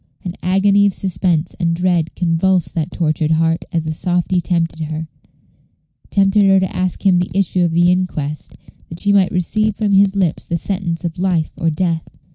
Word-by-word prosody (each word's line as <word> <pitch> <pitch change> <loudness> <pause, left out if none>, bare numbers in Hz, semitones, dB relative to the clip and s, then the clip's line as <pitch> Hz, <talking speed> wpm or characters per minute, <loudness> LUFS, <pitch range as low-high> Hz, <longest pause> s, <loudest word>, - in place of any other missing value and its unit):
An 180 - -4
agony 195 +2 +3
of 195 - -1
suspense 175 -3 -1
and 170 -2 0
dread 175 -2 0
convulsed 175 +1 +1
that 160 0 -2
tortured 155 -3 -1
heart 165 +1 +1
as 165 -1 -1
the 160 0 -3
softy 180 +2 0
tempted 165 -2 -1
her 155 +1 -5 1.0
tempted 195 +1 +3
her 195 -1 +5
to 190 -1 -3
ask 185 +2 -2
him 185 -2 +4
the 180 - -2
issue 185 -2 +1
of 170 - -1
the 175 +2 +3
inquest, 155 -5 -3 0.3
that 165 - -6
she 200 0 +2
might 195 -2 +3
receive 210 +4 0
from 210 -1 -1
his 195 0 +4
lips 185 -5 -1
the 170 - -1
sentence 180 -2 -3
of 170 +1 -4
life 180 -4 0
or 165 - 0
death. 165 0 -2
175 Hz, 185 wpm, -18 LUFS, 165-190 Hz, 1.0 s, her